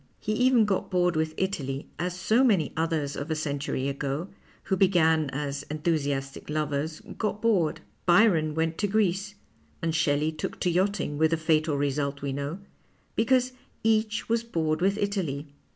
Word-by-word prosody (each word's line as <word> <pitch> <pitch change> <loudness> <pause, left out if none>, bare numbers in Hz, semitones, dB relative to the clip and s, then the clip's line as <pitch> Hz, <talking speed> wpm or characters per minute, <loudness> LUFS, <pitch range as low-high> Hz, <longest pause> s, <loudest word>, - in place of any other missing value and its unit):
He 215 - -3
even 250 -1 +4
got 195 -2 -1
bored 180 -2 +2
with 155 0 -1
Italy, 140 -8 -2
as 180 +1 -2
so 225 +7 +3
many 195 - +2
others 160 -3 -1
of 145 - -5
a 160 - 0
century 140 -3 -2
ago, 140 +5 -3 0.3
who 190 - 0
began 160 -5 +3
as 140 +1 -3
enthusiastic 145 -4 -2
lovers, 150 +1 -2 0.2
got 210 -1 -1
bored. 205 -9 +1 0.3
Byron 175 -5 +4
went 160 0 -1
to 205 - +1
Greece 205 0 0 0.2
— - - -35
and 165 -1 0
Shelley 155 -1 +2
took 155 - -5
to 180 - +2
yachting 180 -5 0
with 160 0 +4
the 165 - +1
fatal 155 -2 +1
result 140 0 -1
we 140 -1 -2
know 140 +5 -3 0.3
— - - -38
because 255 +2 +3 0.3
each 220 0 +1
was 230 0 +1
bored 160 -8 -1
with 195 +2 +2
Italy. 170 -9 -2
160 Hz, 170 wpm, -27 LUFS, 145-200 Hz, 0.3 s, even